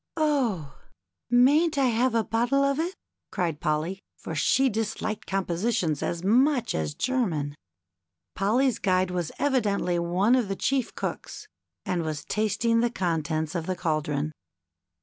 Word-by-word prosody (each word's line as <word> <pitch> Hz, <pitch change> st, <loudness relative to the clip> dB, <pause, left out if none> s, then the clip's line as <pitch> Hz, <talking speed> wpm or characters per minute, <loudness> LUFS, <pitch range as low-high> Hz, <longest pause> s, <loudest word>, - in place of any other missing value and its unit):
" -, -, -39 dB
Oh! 245 Hz, -, 0 dB, 0.5 s
mayn't 285 Hz, +6 st, +4 dB
I 275 Hz, -, +3 dB
have 240 Hz, +1 st, +1 dB
a 225 Hz, -, +3 dB
bottle 240 Hz, +6 st, +1 dB
of 275 Hz, +1 st, +1 dB
it? 350 Hz, +4 st, -2 dB, 0.2 s
" -, -, -60 dB
cried 170 Hz, -6 st, -1 dB
Polly, 155 Hz, +5 st, -1 dB, 0.2 s
for -, -, -7 dB
she 250 Hz, -, +3 dB
disliked 220 Hz, -1 st, -3 dB
compositions 185 Hz, -3 st, 0 dB
as 170 Hz, 0 st, -2 dB
much 250 Hz, +6 st, +3 dB
as 75 Hz, -2 st, -2 dB
German. 180 Hz, -, -1 dB, 0.8 s
Polly's 235 Hz, +6 st, +1 dB
guide 185 Hz, -1 st, +1 dB
was 175 Hz, -3 st, -2 dB
evidently 205 Hz, -10 st, +1 dB
one 180 Hz, +7 st, +2 dB
of 250 Hz, -5 st, +3 dB
the 195 Hz, -, -2 dB
chief 265 Hz, +3 st, -1 dB
cooks, -, -, -5 dB, 0.4 s
and 175 Hz, -2 st, -1 dB
was 155 Hz, -2 st, -4 dB
tasting 220 Hz, +2 st, +1 dB
the 240 Hz, +1 st, +2 dB
contents 160 Hz, -5 st, -1 dB
of 165 Hz, -3 st, -3 dB
the 185 Hz, -, -1 dB
caldron. 155 Hz, -3 st, -1 dB
200 Hz, 150 wpm, -26 LUFS, 170-245 Hz, 0.8 s, mayn't